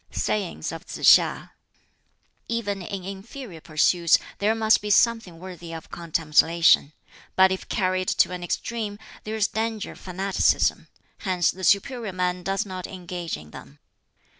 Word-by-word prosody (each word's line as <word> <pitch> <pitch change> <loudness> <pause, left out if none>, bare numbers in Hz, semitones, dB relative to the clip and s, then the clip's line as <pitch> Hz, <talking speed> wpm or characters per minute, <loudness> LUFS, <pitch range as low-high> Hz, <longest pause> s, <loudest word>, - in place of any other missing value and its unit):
Sayings 185 - -2
of - - -8
Tsz - - -9 0.2
hiŠ: - - -5 1.0
"Even 205 -4 -2
in 190 +1 -6
inferior 195 - -8
pursuits 165 +2 +3 0.2
there 215 +2 +2
must 220 0 +3
be 210 - -4
something 220 -4 +2
worthy 175 -1 -9
of 160 -1 -9
contemplation, 165 -2 +3 0.4
but 190 0 +6
if 190 - -4
carried 185 -1 0
to - - +2
an 180 -1 -5
extreme 210 +3 -3 0.3
there 215 +1 -4
is 215 -2 +2
danger 220 -1 -3
of - - -14
fanaticism; 190 +1 +1 0.3
hence 180 -4 +1
the 185 - -11
superior 210 +2 +1
man 180 0 -1
does 195 +4 -1
not 185 -2 -6
engage 180 -2 -6
in 75 0 -14
them. 70 +2 -12
185 Hz, 145 wpm, -24 LUFS, 175-210 Hz, 1.0 s, but